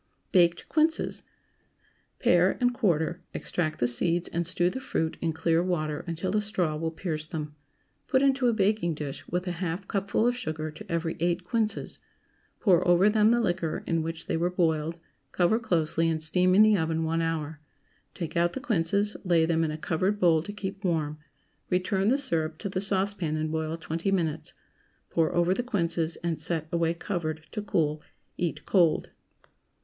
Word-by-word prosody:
BAKED 175 -2 +3
QUINCES. 315 +1 +1 1.0
Pare - - +3
and 245 -1 +2
quarter; 175 - 0
extract 155 -3 -2
the 120 - +1
seeds 170 +8 +1
and 170 0 -1
stew 175 -1 +2
the 260 - -4
fruit 160 -10 -2
in 165 - 0
clear 165 +1 +1
water 155 -5 -1
until 170 +4 -2
a 210 - +3
straw 185 -7 0
will 160 +1 -2
pierce 160 -2 -4
them; 150 -2 -5 0.5
put 265 -1 +3
into 270 -2 +3
a - - +4
baking 200 -5 +1
dish 145 -1 -6
with 180 +2 -2
a 180 - -2
half 180 +2 -3
cupful 200 +2 0
of 245 - +1
sugar 155 -8 -4
to 155 - -11
every 165 -1 -1
eight 175 +2 0
quinces; 220 +2 -2 0.6
pour 180 -4 +4
over 175 +4 +5
them 215 0 +4
the 240 +1 +4
liquor 175 -5 -1
in 165 -1 0
which 165 +1 -5
they - - -1
were 170 +2 +1
boiled; 165 -2 0 0.3
cover 180 +5 +2
closely, 165 -5 +1
and 160 -1 -1
steam 180 +3 +3
in 210 - +8
the 215 -1 +5
oven 160 -2 0
one 165 +1 0
hour; 160 -2 -2 0.6
take 170 -1 -5
out 170 0 +2
the - - -4
quinces, 205 - +1
lay 170 -4 +3
them 165 0 +1
in 160 - 0
a 155 - -4
covered 185 +6 0
bowl 165 -4 +4
to 205 - -7
keep 200 0 -6
warm; 155 -4 -1 0.5
return 190 +2 +1
the 260 +5 +4
syrup 165 - -1
to 200 - -4
the 185 0 -2
saucepan, 195 -5 0
and 155 0 -2
boil 160 0 -2
twenty 165 +3 -2
minutes; 160 -4 -1 0.6
pour 165 -1 +2
over 175 +1 +3
the 220 - -1
quinces, 170 -8 -1
and 170 -2 -1
set 160 -2 -2
away 170 -1 +1
covered, 165 -3 -4
to 210 - -3
cool. 155 -6 0 0.4
Eat 175 -2 -2
cold. 170 -5 +2
170 Hz, 180 wpm, -27 LUFS, 160-195 Hz, 1.0 s, in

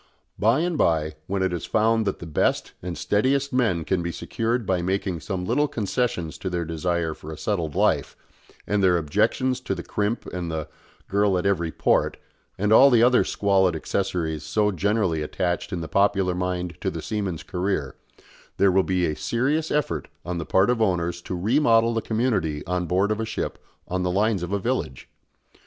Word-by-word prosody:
By 115 +8 +3
and 175 -2 -1
by, 80 -2 +2
when 95 0 -1
it 95 -1 0
is 85 - -4
found 110 0 +2
that 100 - -1
the - - -9
best 80 - 0
and 85 -1 -5
steadiest 135 +6 +1
men 110 -10 +1
can 90 +3 0
be 85 0 -3
secured 115 +6 -2
by 95 -2 +1
making 95 -1 -1
some 90 +2 -4
little 145 +10 +2
concessions 105 - -2
to 95 - -3
their 90 -1 -2
desire 80 0 -1
for 75 +1 -10
a 80 - -7
settled 85 -8 -2
life - - +1 0.5
and 105 0 0
their 90 -2 +4
objections 125 - +1
to 130 -6 -3
the 85 - -6
crimp 105 +3 -2
and 90 -2 -5
the 80 -2 -3 0.4
"girl 100 -1 +2
at 90 - -2
every 85 -5 +1
port," - - +1 0.4
and 105 +3 +2
all 135 +5 +8
the 120 -3 +5
other 125 +1 +5
squalid 95 -3 +2
accessories 80 -2 -2
so 105 +7 +1
generally 95 -3 0
attached 85 +5 -2
in 90 -3 -3
the 80 - -5
popular 95 +1 +2
mind 90 -2 -3
to - - 0
the - - -6
seaman's 100 -6 -3
career, 90 -7 -2 0.6
there 100 -1 +4
will 95 +1 +4
be 90 -1 0
a 75 - -1
serious 130 - 0
effort 85 - -1 0.2
on 90 -1 -3
the 80 - -5
part 95 +5 +4
of 120 -2 -1
owners 90 -4 0
to 90 - -5
remodel 115 +1 +3
the 115 - 0
community 105 -11 -1
on 90 0 -1
board 95 +4 +1
of 110 - -1
a - - 0
ship 110 - -4 0.2
on 95 0 -2
the 90 - 0
lines 100 +1 +1
of 90 +1 -4
a 100 - +1
village. 65 -8 -3
95 Hz, 195 wpm, -24 LUFS, 85-110 Hz, 0.6 s, all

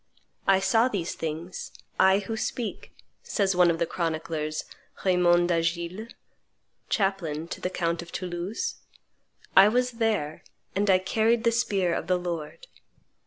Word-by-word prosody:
"I 195 -1 +5
saw 225 +5 +3
these 190 -9 -2
things, 165 +3 -5 0.3
I 190 +1 +6
who 205 +2 -3
speak," 225 +1 -4 0.3
says 195 -3 0
one 180 -1 +5
of 165 - +1
the 170 - +1
chroniclers, 160 -2 -2 0.4
Raymond 175 -1 +4
d'Agiles, 170 +6 -1 0.8
chaplain 175 -6 -1
to - - -6
the 180 - -1
count 170 -2 -1
of 170 - -11
Toulouse: 185 - -3 0.8
"I 195 +1 +9
was 250 +3 +2
there, 195 -10 0 0.3
and 200 +1 +1
I 185 - +7
carried 220 +5 +1
the 230 - +4
spear 195 -6 +1
of - - -3
the 180 0 +3
Lord." 175 - -5
185 Hz, 140 wpm, -27 LUFS, 170-205 Hz, 0.8 s, I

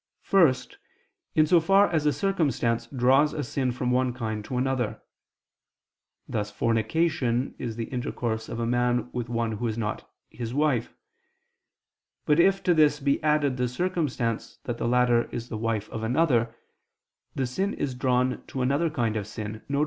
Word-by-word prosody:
First, 155 -10 +2 0.6
in 155 - +5
so 175 +2 +5
far 195 +5 +4
as 155 -3 0
a - - +4
circumstance 140 - 0
draws 135 +5 +3
a 150 - -2
sin 130 +1 -1
from 125 0 -2
one 125 0 +1
kind 110 -3 -4
to 125 - -4
another: 130 -3 -1 1.3
thus 105 -2 -2
fornication 120 +4 0
is 115 -3 -4
the 115 - -3
intercourse 115 -2 -3
of 115 - -5
a 115 - 0
man 120 +1 0
with 120 -1 -3
one 115 -1 -1
who 115 +2 -2
is 110 0 -3
not 105 -2 -4 0.2
his 120 +1 -5
wife: 145 -6 +1 1.3
but 150 +2 +3
if 195 +3 +4
to 180 - +4
this 150 -2 +4
be 140 -1 +1
added 150 -3 +2
the 125 0 +1
circumstance 130 -6 -2
that 120 -1 -4
the - - -1
latter 120 -1 +3
is 120 +1 -7
the 110 - -4
wife 110 -2 -1
of 110 - -4
another, 120 -2 +1 0.8
the 135 - 0
sin 190 +12 -2
is 135 - -2
drawn 125 0 0
to 130 - -3
another 140 +6 +1
kind 115 -6 -1
of 105 -2 -3
sin, 110 0 -6
viz. 140 0 0
125 Hz, 170 wpm, -26 LUFS, 115-150 Hz, 1.3 s, in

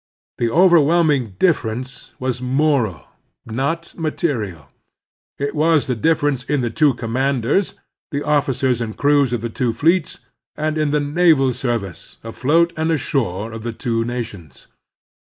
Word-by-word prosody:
The 120 - +1
overwhelming 160 - +3
difference 130 -6 -1
was 130 -1 -3
moral, 130 - 0 0.4
not 140 +9 -3
material. 115 - -3 0.7
It 140 +1 -2
was 155 0 +2
the 130 - -1
difference 145 +1 +1
in 145 0 -1
the 120 -2 -2
two 145 +1 +3
commanders, 130 - 0
in - - -31 0.4
the 145 - -2
officers 135 -4 +1
and 110 -2 -5
crews 145 -3 +3
of 120 -3 -1
the 120 - -3
two 115 +1 -1
fleets, 165 +5 +1 0.4
and 155 +1 -2
in 155 -1 0
the 150 +1 +1
naval 145 -3 +3
service, 115 -8 -4
afloat 155 +9 +1
and 160 0 -1
ashore, 125 - -1
of 110 0 -7
the 115 +1 -4
two 115 -1 -1
nations. 110 - -6
135 Hz, 140 wpm, -20 LUFS, 115-155 Hz, 0.7 s, overwhelming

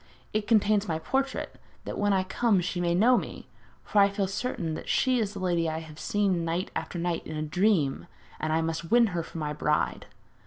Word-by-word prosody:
It 215 -1 -1
contains 215 -2 +3
my 160 -2 0
portrait, 270 +11 -2 0.3
that - - -4
when 205 0 +1
I 190 -1 +2
come 200 +2 +2
she 175 0 -2
may 170 -1 +1
know 240 +7 +5
me; - - -8 0.4
for 210 - +1
I 200 0 +6
feel 200 0 -1
certain 190 -4 -3
that - - -6
she 255 -2 +2
is 210 -3 -1
the - - -5
lady 175 -3 +1
I 160 - -3
have 155 -1 -11
seen 195 -4 +1
night 170 +3 -2
after - - -4
night 170 -1 -2
in 155 - -5
a 155 - -2
dream, 160 -3 +1 0.3
and 155 - -1
I 160 +1 +2
must 165 +1 -3
win 235 +2 +6
her 170 - 0
for 165 - -9
my 150 -2 -2
bride.' 150 0 0
180 Hz, 220 wpm, -28 LUFS, 165-205 Hz, 0.4 s, I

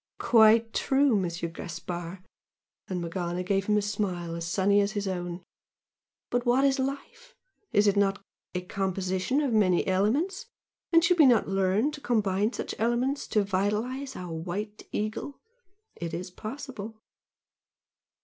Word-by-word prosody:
"Quite 225 -1 +5
true, 270 -2 +3
Monsieur 170 -3 -1
Gaspard!" 175 +1 -6 0.6
and 180 -2 -3
Morgana 175 +1 -3
gave 195 +1 0
him 210 0 +3
a 210 - +1
smile 190 -5 -2
as 170 0 -4
sunny 200 +3 +3
as 200 +1 -1
his 205 -2 -2
own. 175 -1 -4 0.9
"But 245 0 +1
what 250 +3 +3
is 275 0 +2
life? 460 - -5 0.4
Is 205 - +4
it 200 -1 +4
not 200 0 +2 0.4
a 180 - 0
composition 190 +6 -1
of 275 -5 0
many 185 -5 +3
elements? 280 - 0 0.4
And 330 -1 +6
should 345 +1 +3
we 300 - +8
not 240 -3 +4
learn 195 +7 +2
to 295 -1 -9
combine 210 -3 +1
such - - -4
elements 240 +5 0
to 210 - +2
vitalise 210 +8 -1
our 180 -2 -6
'White 190 +6 -5
Eagle'? 215 +6 -3 0.6
It 170 -1 -5
is 180 +2 -6
possible!" 220 0 -7
205 Hz, 145 wpm, -28 LUFS, 185-245 Hz, 0.9 s, we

